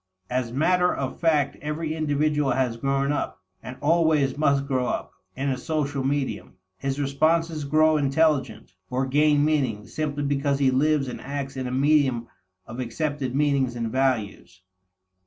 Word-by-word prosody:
As 125 -2 -1
matter 180 +7 +2
of 135 -1 -4
fact 155 -5 +1
every 155 +1 -3
individual 150 -2 +1
has 125 -2 0
grown 135 +3 0
up, 145 - -3 0.2
and 130 - -8
always 155 -3 +2
must 140 -2 +2
grow 130 -3 0
up, - - -3 0.2
in 135 +2 -2
a 130 -2 -2
social 145 -1 -2
medium. 135 -6 -2 0.3
His 135 +1 -2
responses 155 +2 +1
grow 155 +2 +3
intelligent, 140 -8 0 0.2
or 130 +1 0
gain 145 +2 +3
meaning, 130 -9 0
simply 145 -2 -3
because 140 0 0
he 135 -2 +3
lives 145 +1 +2
and 125 - -6
acts 140 0 -5
in 130 -1 -3
a - - -4
medium 135 -3 +2 0.4
of 120 +2 -9
accepted 130 +2 -3
meanings 140 -4 +1
and 115 -2 -3
values. 110 -8 -1
140 Hz, 155 wpm, -25 LUFS, 130-150 Hz, 0.4 s, grow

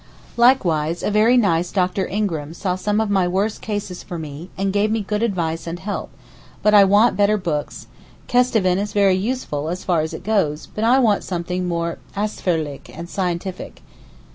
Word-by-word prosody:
Likewise 175 - +3
a - - 0
very 220 +4 +4
nice 175 -6 +2
Dr. 185 0 0
Ingram 165 -7 -2
saw 180 -1 -1
some 210 +3 0
of 220 -2 0
my 190 -3 +2
worst 195 +4 -1
cases 205 -4 -4
for 175 - -7
me, 155 +2 -8
and 195 0 -1
gave 205 +1 +2
me 220 0 0
good 210 +1 -2
advice 170 -7 -1
and 165 +1 -4
help; 200 +3 -5 0.5
but 210 - +4
I 205 -1 +9
want 205 +4 +4
better 205 +2 +3
books—Kesteven 185 +5 -1
is 205 0 -3
very 200 -2 +4
useful, 190 - -2
as 180 +2 -4
far 175 -4 +1
as 155 - -4
it - - -9
goes, 190 -8 0
but 215 - -3
I 240 +3 +5
want 220 -6 +3
something 180 0 -3
more 170 -1 -2 0.2
ausführlich 170 -8 -2
and 170 +2 -8
scientific. 180 - -4
190 Hz, 175 wpm, -21 LUFS, 170-210 Hz, 0.5 s, I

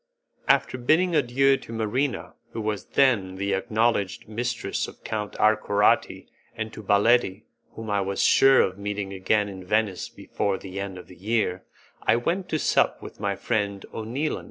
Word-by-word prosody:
After 130 - +2
bidding 165 +8 +2
adieu 135 0 +3
to - - -12
Marina, 115 +4 -2 0.2
who 115 - -4
was 105 -2 -3
then 105 -9 +2
the 100 +1 -1
acknowledged 110 -1 0
mistress 120 -2 -2
of - - -14
Count 105 -2 -4
Arcorati, 105 -1 +2 0.3
and 110 0 -5
to - - -8
Baletti 105 0 +2 0.3
whom 110 -2 -6
I 100 -1 +1
was 95 0 -1
sure 135 0 +6
of 95 +1 -1
meeting 100 -1 -4
again 100 +2 +1
in 95 -2 -8
Venice 105 -1 0
before 100 -2 -3
the 95 +1 -7
end 100 -1 -5
of 90 - -10
the 90 - -15
year, 100 -2 -1 0.4
I - - +3
went 175 +10 -1
to 155 - 0
sup - - +1
with - - -10
my 100 -1 -1
friend 100 -3 -2
O'Neilan. 125 +8 -2
105 Hz, 165 wpm, -25 LUFS, 100-120 Hz, 0.4 s, sure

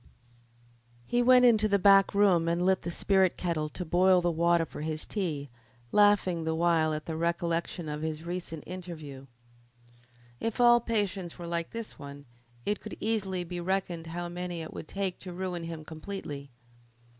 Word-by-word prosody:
He 240 - +1
went 250 0 +6
into 220 -3 +5
the 200 -1 +3
back 195 0 +5
room 185 -5 +4
and 170 +1 +1
lit 190 0 +3
the - - -4
spirit 190 +1 +2
kettle 160 -4 -1
to 180 +4 -6
boil 180 +3 +4
the 175 0 +1
water 170 0 +2
for 150 - -9
his 155 0 -3
tea, 150 - -3 0.4
laughing 205 -5 +4
the 160 0 -1
while 165 -1 +2
at 155 0 -4
the 160 - -4
recollection 170 0 -1
of 150 0 -4
his 160 0 -3
recent 170 -3 -5
interview. 155 -7 -8 1.1
If 230 +2 -3
all 240 0 +7
patients 200 -6 -2
were 175 - -7
like 170 0 -2
this 230 -1 -7
one 140 0 -9 0.4
it 205 - 0
could 215 - -8
easily 195 -5 -1
be 175 +1 -6
reckoned 175 -2 -2
how 175 +1 -4
many 175 -1 -5
it 160 - -9
would - - -7
take 195 -2 -3
to 180 -2 -8
ruin 180 -2 -4
him 165 -2 -7
completely. 155 -4 -7
175 Hz, 170 wpm, -29 LUFS, 160-195 Hz, 1.1 s, all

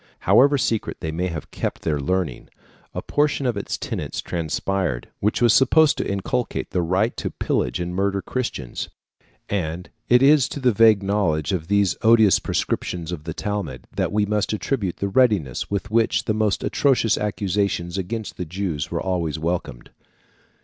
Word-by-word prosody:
However 135 +9 +5
secret 115 -4 -1
they 80 - -3
may 90 +3 -1
have 80 -3 -6
kept - - -4
their 75 -3 0
learning, 90 +4 -2 0.4
a - - -5
portion 145 -2 0
of 120 -3 +1
its 100 - -3
tenets - - -4
transpired, 85 -2 -2
which 105 +4 0
was 120 -3 +6
supposed 135 +3 +5
to - - -1
inculcate 105 +5 -2
the 90 - +1
right 95 +7 +1
to - - -2
pillage - - -1
and 90 0 -3
murder 100 +1 0
Christians; 95 - -4 0.6
and 90 -3 -3 0.2
it 125 +2 +5
is 140 -2 +5
to - - -5
the 130 -2 +3
vague 110 -1 +5
knowledge 95 -6 0
of 85 -4 -2
these 100 -2 +2
odious 110 -4 +5
prescriptions 85 -1 -2
of 80 -3 -6
the 80 - -4
Talmud 95 -12 -4
that - - 0
we 105 0 +2
must 105 +1 0
attribute 105 -4 -2
the 100 - -1
readiness 100 - +1
with 100 +1 -3
which 115 0 +2
the 110 - +1
most 105 -2 0
atrocious 125 -6 +2
accusations 100 -4 -1
against 105 +3 -5
the 90 - -3
Jews 85 -3 -3
were - - -2
always 85 -5 -1
welcomed. 80 -7 -4
100 Hz, 170 wpm, -23 LUFS, 85-110 Hz, 0.6 s, was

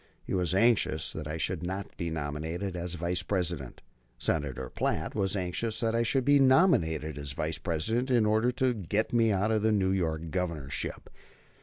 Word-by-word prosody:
He - - -5
was 90 -2 +1
anxious 95 -7 +2
that 75 -2 -5
I 75 +2 -3
should 90 +1 -2
not 95 +2 -5
be 85 - -3
nominated 80 +5 -3
as 90 0 -3
Vice 85 +1 -1
President. 85 -8 -2 0.4
Senator 70 +1 -2
Platt - - -1
was 95 -2 0
anxious 100 +4 -2
that 115 -3 0
I 115 - +2
should 125 +2 +1
be 145 0 +5
nominated 80 - +3
as 70 -1 -5
Vice 80 +2 -2
President, 110 - -1
in 120 -4 +4
order 110 +3 +3
to 130 0 +1
get 105 +1 -1
me 115 -2 +4
out 100 +2 +1
of 110 -1 +2
the 110 +1 +3
New 95 -3 +2
York 80 -4 -1
Governorship. 75 -7 -3
90 Hz, 180 wpm, -29 LUFS, 80-110 Hz, 0.4 s, be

